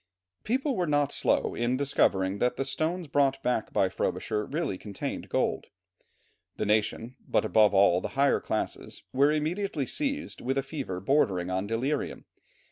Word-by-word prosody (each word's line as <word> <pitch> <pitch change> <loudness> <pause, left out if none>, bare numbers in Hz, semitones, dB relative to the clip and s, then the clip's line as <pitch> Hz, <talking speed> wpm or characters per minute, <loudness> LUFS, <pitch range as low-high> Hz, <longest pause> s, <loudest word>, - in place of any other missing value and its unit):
People 265 +4 0
were 180 -4 0
not 145 -1 +2
slow - - +1
in 120 +2 0
discovering 100 -8 +1
that 125 +2 +1
the 135 - -2
stones 160 +6 -1
brought 135 -2 +1
back 125 -3 0
by 95 - +2
Frobisher 105 +3 -2
really 155 - -2
contained 100 +1 -6
gold. - - 0 0.9
The - - -2
nation, 110 +3 0
but - - +1
above 105 -2 +4
all 95 -2 +5
the - - -2
higher 140 0 +4
classes, - - -4
were 140 +3 +4
immediately 155 0 -1
seized 285 - -2
with 135 +2 -1
a 135 - +1
fever 135 - -5
bordering 95 -6 +1
on 95 +2 -1
delirium. 130 +7 -2
135 Hz, 155 wpm, -28 LUFS, 105-150 Hz, 0.9 s, all